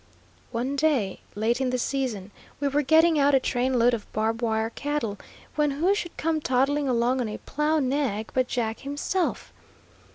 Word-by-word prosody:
One 255 +4 -2
day, 275 -10 +1 0.2
late 230 +5 0
in 260 - +1
the 255 - 0
season, 240 -7 -2 0.3
we 285 - 0
were 285 +2 +2
getting 320 +2 +4
out 280 0 +4
a - - +5
train 255 0 0
load 240 +1 +4
of 225 -3 -4
"Barb 225 +2 0
Wire" 220 -1 0
cattle, 270 -7 -3 0.3
when 300 -1 +2
who 320 +8 +2
should 350 -4 -4
come 320 -1 0
toddling 275 +2 +1
along 245 +1 +2
on 230 - -2
a 210 - -5
plow 300 +2 0
nag 260 -6 -1
but 255 -1 +1
Jack 225 -3 -2
himself. 290 +6 -2
260 Hz, 175 wpm, -26 LUFS, 230-290 Hz, 0.3 s, a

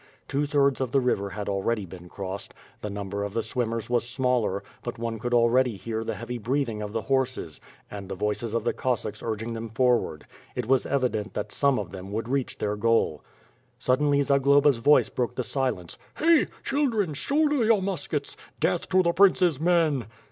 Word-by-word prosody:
Two 145 +1 0
thirds 140 -2 +2
of 130 -3 -1
the 135 - +4
river 110 -6 0
had 105 +1 -5
already 100 +2 -1
been 90 0 -11
crossed. 95 +1 -6 0.3
The 105 - -4
number 100 0 -4
of 100 0 -5
the 115 - 0
swimmers 115 -1 -2
was 120 -1 +1
smaller, 120 -6 0 0.2
but 120 0 -5
one 115 -1 -3
could 120 +3 -3
alrendy 120 -1 +3
hear 110 +1 -4
the - - -3
heavy 120 +1 -5
breathing 120 -1 -1
of 105 -1 -4
the 110 0 -2
horses, 130 - -1 0.3
and 100 -2 -7
the 95 - -4
voices 105 +3 -2
of 115 - 0
the 120 - 0
(■ossacks 115 -4 -2
urging 115 +1 -3
them 115 0 -5
for 125 +1 +3
ward. 75 -1 -7 0.3
It 125 - -2
was 130 +2 +2
evident 125 -6 -1
that - - -3
some 140 -2 +2
of 100 -4 -4
them 95 0 -8
would 115 +1 -2
reach 135 -1 -1
their 105 0 -1
goal. 110 -8 +1 0.5
Suddenly, 140 +3 +2
Zagloba's 140 0 +4
voice 145 +6 +4
broke 125 0 -2
the 125 - -1
silence: 125 -11 -2 0.2
"Hey! 325 0 +4 0.2
Children, 235 - 0
shoulder 290 - +1
your 220 -3 +3
muskets! 195 0 -3 0.2
Death - - 0
to 185 0 +4
the 170 -1 +2
prince's 180 -6 +4
men!" 160 - +2
120 Hz, 190 wpm, -26 LUFS, 105-140 Hz, 0.5 s, the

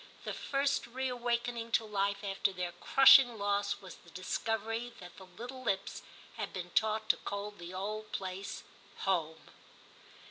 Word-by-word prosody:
The - - -3
first 280 -1 0
reawaken 245 -1 -1
ing 230 0 -5
to 225 - +3
life 200 -1 0
after 195 0 0
their 180 -2 -3
crushing 270 +1 +7
loss 200 0 0
was 190 -2 -10
the 170 - -18
discovery 225 +6 -2
that 180 -2 -11
the 190 - -12
little 250 +6 -8
lips 195 -5 -1 0.4
had - - -3
been 180 -1 -5
taught 220 0 +1
to - - +5
call 200 +1 -4
the 175 -4 -10
old 215 +3 -4
place 190 +1 -4 0.4
*home.' 165 -4 -1
205 Hz, 150 wpm, -33 LUFS, 190-235 Hz, 0.4 s, crushing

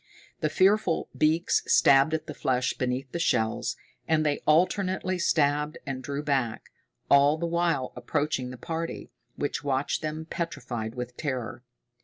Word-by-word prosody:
The 155 - 0
fearful 190 0 +2
beaks 160 +3 +2
stabbed 140 +3 +5
at 155 0 -4
the - - -6
flesh 130 -2 0
beneath 125 0 -3
the 170 - -3
shells, 110 -9 0 0.3
and 155 -1 +2
they 145 -1 +1
alternately 185 +3 +2
stabbed 150 -3 +1
and 135 -2 -4
drew 140 +3 -4
back, 135 -6 -1 0.4
all 140 +2 +5
the 170 - -2
while 170 -6 0
approaching 135 0 -1
the 125 - -8
party, 165 +6 -5 0.2
which 145 - -3
watched 135 0 0
them, 155 +1 -4
petrified 120 -10 -4
with 125 0 -5
terror. 130 -5 -4
145 Hz, 145 wpm, -27 LUFS, 130-165 Hz, 0.4 s, stabbed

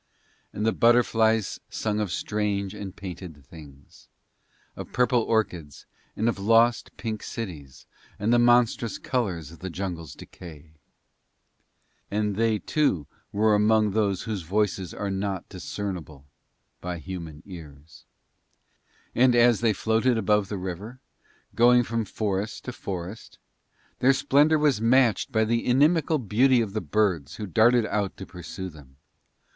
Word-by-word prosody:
And 105 - -3
the 110 - +3
butterflies 115 -3 +2
sung 105 -1 -2
of 105 -4 -2
strange 100 +2 -2
and 95 -3 -7
painted 85 -6 -9
things, 70 -2 -15 0.7
of - - -8
purple 125 -1 +2
orchids 90 -11 -2 0.3
and 110 - 0
of 115 - 0
lost 115 +4 +2
pink 110 -2 -4
cities 80 - -7 0.3
and 110 +4 +1
the 120 - +5
monstrous 120 -1 +3
colours 90 - -2
of 85 - -14
the 95 - -5
jungle's 85 -4 -5
decay. 80 -3 -12 1.4
And 105 -1 -1
they, 110 0 +2
too, 105 - 0 0.3
were 105 +1 +2
among 105 0 +3
those 100 -3 0
whose 105 -4 -3
voices 95 +1 -1
are 100 -1 -4
not 95 -1 -3
discernible 90 -7 -6 0.6
by 90 -1 -4
human 85 -2 -8
ears. 80 -5 -12 1.1
And 125 0 +4
as 120 -2 +4
they 115 -2 +3
floated 110 +4 +1
above 105 -1 +1
the 105 - -3
river, 95 +7 -6 0.5
going 120 +1 +5
from 115 -1 -2
forest 105 0 -3
to 125 - -5
forest, 95 0 -7 0.6
their 135 +2 +5
splendour 145 +3 +3
was 145 -7 +2
matched 120 +1 +3
by 110 -2 +2
the 115 +1 0
inimical 155 +5 +3
beauty 125 +2 +3
of 110 -4 -2
the 110 - -2
birds 85 -4 0
who 105 - -5
darted 110 +6 +4
out 105 -3 -2
to 95 - -7
pursue 90 0 -8
them. 70 -5 -16
105 Hz, 140 wpm, -26 LUFS, 90-115 Hz, 1.4 s, the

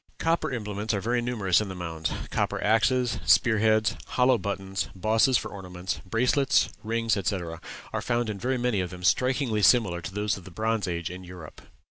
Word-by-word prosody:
Copper 165 -2 0
implements 105 -2 -3
are - - -1
very 120 +4 0
numerous 110 -7 +1
in 105 - -3
the 95 - -6
mounds. 80 -3 -3 0.2
Copper - - -1
axes, 120 +3 +2
spear 110 -2 +4
heads, 110 0 +3
hollow 125 -1 +3
buttons, 95 -1 -3
bosses 110 +6 +3
for - - -5
ornaments, 90 -2 -5
bracelets, 125 +5 +2
rings, 115 0 0
etc., 90 -5 -3 0.3
are - - -1
found 120 -1 0
in 105 -2 -4
very 130 +3 0
many 120 -4 0
of 90 - -3
them 90 0 -10
strikingly 125 - +2
similar 100 -5 +4
to 85 - -6
those 105 +1 -1
of 95 - -11
the 95 - -11
Bronze 110 +2 -1
Age 85 -1 -3
in 90 +1 -8
Europe. 90 -3 -11
105 Hz, 185 wpm, -27 LUFS, 95-120 Hz, 0.3 s, spear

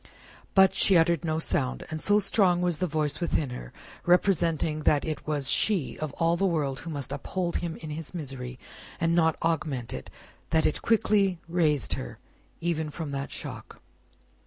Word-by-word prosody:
But, 190 -1 +6
she 190 - +4
uttered 170 0 +3
no 160 -1 0
sound; 65 - -1
and 155 0 -4
so 205 0 +4
strong 195 -3 +3
was 175 -3 0
the 185 - +1
voice 150 -2 -1
within 155 -6 0
her, - - -7 0.3
representing 170 -4 +2
that 150 -1 +2
it 155 -2 -4
was 145 -3 -1
she 195 -10 +2
of 155 -2 -3
all 165 +2 +2
the 195 +2 +1
world 145 -6 -1
who 170 - -8
must 145 -5 -4
uphold 180 -2 -2
him 170 -2 -3
in 155 -1 -8
his 155 +1 -5
misery 135 -7 -5 0.4
and 165 0 +2
not 160 -2 +3
augment 150 -7 -1
it, 65 - -7 0.4
that 160 -1 +2
it 155 - 0
quickly 210 -4 +2
raised 160 -5 +1
her, - - -5 0.4
even 160 -2 -1
from 150 -1 -5
that 140 0 -3
shock. - - -7
160 Hz, 175 wpm, -27 LUFS, 145-175 Hz, 0.4 s, But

